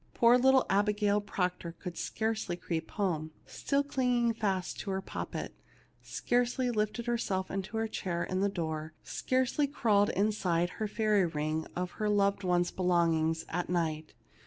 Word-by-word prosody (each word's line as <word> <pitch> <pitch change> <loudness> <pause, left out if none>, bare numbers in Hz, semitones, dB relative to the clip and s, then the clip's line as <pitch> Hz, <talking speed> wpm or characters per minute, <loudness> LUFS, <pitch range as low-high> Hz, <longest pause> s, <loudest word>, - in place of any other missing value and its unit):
Poor 235 +1 +6
little 265 +1 +5
Abigail 205 +1 +2
Proctor 180 -4 -2
could 175 0 -7
scarcely 220 -5 -2
creep 165 -2 -4
home, 165 -6 -1 0.2
still 280 0 0
clinging 250 -4 +1
fast 195 -5 -2
to 200 - -5
her 190 0 0
poppet; 190 - -5 0.5
scarcely 245 +1 0
lift 215 -1 0
herself 205 -6 -1
into 195 +3 -3
her 225 0 0
chair 175 -5 -2
in 185 +1 -1
the 200 - +3
door; 160 -4 -4
scarcely 260 +3 0
crawl 210 -7 +2
inside 185 -4 +1
her 215 - -3
fairy 210 -3 +2
ring 155 0 -2
of 180 0 -2
her 210 - +2
loved 200 -1 +2
ones' 175 -1 +2
be - - -6
longings 165 -2 +2
at 175 +1 -2
night. 160 -3 -1
195 Hz, 155 wpm, -31 LUFS, 175-220 Hz, 0.5 s, Poor